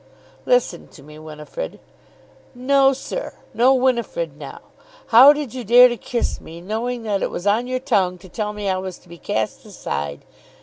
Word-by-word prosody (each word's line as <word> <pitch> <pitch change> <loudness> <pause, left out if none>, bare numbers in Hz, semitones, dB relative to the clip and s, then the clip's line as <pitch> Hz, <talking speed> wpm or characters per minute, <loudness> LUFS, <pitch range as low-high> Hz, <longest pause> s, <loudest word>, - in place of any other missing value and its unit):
"Listen - - +1
to - - -16
me, 150 +1 -13
Winifrid." 155 - -8 0.8
"No, 270 +2 +3
sir; 275 - -6 0.2
no 255 +3 +4
Winifrid 260 - -1
now! - - -10 0.5
How 250 +5 +9
did 295 -5 -3
you 255 -1 -6
dare 245 +3 +7
to 240 - -3
kiss 235 +1 -3
me, 165 +1 -11
knowing 225 +6 -4
that 205 -3 -1
it - - -1
was 175 - -6
on 220 +4 +1
your 255 0 -2
tongue 195 -9 0
to 180 - -15
tell 210 +3 -4
me 210 -1 -5
I 190 -1 0
was 185 -1 -6
to - - -24
be 170 0 -12
cast 110 0 -3
aside? 70 0 -6
230 Hz, 180 wpm, -21 LUFS, 185-255 Hz, 0.8 s, How